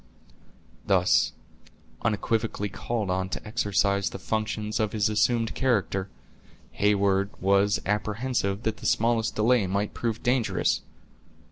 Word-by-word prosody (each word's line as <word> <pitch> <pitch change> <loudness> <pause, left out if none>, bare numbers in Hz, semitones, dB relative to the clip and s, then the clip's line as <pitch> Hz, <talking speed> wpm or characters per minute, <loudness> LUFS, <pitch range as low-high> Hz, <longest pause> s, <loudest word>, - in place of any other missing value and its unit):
Thus - - +3 0.7
unequivocally 110 -1 -1
called 105 +1 -3
on 95 0 -1
to 105 - -6
exercise 100 -3 +1
the - - -7
functions 110 0 -2
of 110 -2 0
his 110 -1 +1
assumed 115 +2 +1
character, 100 -7 0 0.6
Heyward 100 -1 +2
was 100 +1 +3
apprehensive 105 0 -1
that 110 -1 -1
the 115 - -4
smallest 115 0 +1
delay 110 -1 +3
might 100 +2 -1
prove 115 -2 -3
dangerous. 125 -2 +1
105 Hz, 115 wpm, -26 LUFS, 100-115 Hz, 0.7 s, Thus